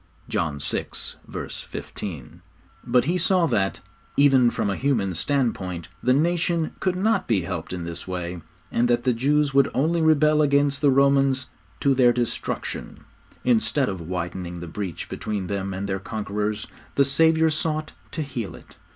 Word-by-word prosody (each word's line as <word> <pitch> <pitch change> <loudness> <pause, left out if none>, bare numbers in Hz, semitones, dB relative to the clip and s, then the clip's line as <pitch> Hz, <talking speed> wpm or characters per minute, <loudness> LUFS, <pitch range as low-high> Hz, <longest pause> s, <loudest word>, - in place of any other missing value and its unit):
(John 80 -4 -1
vi. 70 - -2 0.6
15.) 80 -12 -7 0.4
But 125 0 +3
He 175 +4 +1
saw 185 -2 +3
that, 95 -10 0 0.4
even 135 -4 +6
from 120 - -1
a - - -1
human 115 -9 +1
standpoint, 95 - -1
the 125 - +2
nation 170 +3 +1
could 185 -1 0
not 195 0 +1
be 110 -5 +2
helped 85 -2 -5
in 90 -2 -4
this 85 +1 -6
way, 90 -1 -4 0.3
and 120 +1 +2
that 120 0 +2
the 125 -1 +3
Jews 140 +4 +2
would 140 0 +5
only 165 +5 +2
rebel 155 -1 +4
against 140 -1 +2
the 145 - +5
Romans 135 -1 +3 0.4
to 140 - +4
their 125 -2 +5
destruction. 120 -1 -3 0.4
Instead 125 +3 +2
of 95 -3 -4
widening 85 +1 -4
the 85 - -6
breach 90 0 -5
between 105 -3 -3
them 100 0 -3
and 95 +1 -3
their 95 -1 -1
conquerors, 105 +1 -3 0.3
the 140 - +5
Saviour 160 +3 +4
sought 155 0 -1 0.2
to 155 - -3
heal 120 -8 -5
it. - - -16
125 Hz, 160 wpm, -24 LUFS, 95-145 Hz, 0.6 s, even